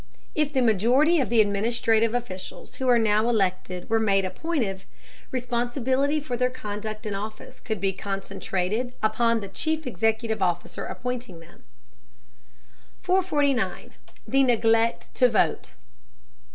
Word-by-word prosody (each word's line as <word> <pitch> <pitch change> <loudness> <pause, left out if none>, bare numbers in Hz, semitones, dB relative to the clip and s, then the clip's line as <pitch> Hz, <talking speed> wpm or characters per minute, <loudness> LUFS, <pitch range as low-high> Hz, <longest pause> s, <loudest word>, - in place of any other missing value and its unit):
If 300 -1 +1
the 265 -3 +2
majority 245 - +4
of 265 - 0
the 230 -1 +5
administrative 225 +2 +2
officials 190 -7 -6
who 260 - 0
are 245 - +6
now 220 0 +2
elected 185 -4 -1
were 225 0 +2
made 195 -3 +2
appointive, 195 - -3 0.4
responsibility 255 +3 0
for 280 -4 -4
their 250 +1 +1
conduct 215 -3 -6
in 210 - -2
office 210 +2 -7
could 220 -3 -4
be 195 -1 0
concentrated 195 +4 -3
upon 230 +1 +2
the 200 - -6
chief 315 +10 -2
executive 225 -2 0
officer 175 -1 -1
appointing 250 -8 -5
them. 165 +1 -18 1.4
449. 290 - +1 0.4
THE 270 - +3
NEGLECT 230 -2 +2
TO 250 - +4
VOTE. 220 - 0
225 Hz, 125 wpm, -25 LUFS, 205-250 Hz, 1.4 s, are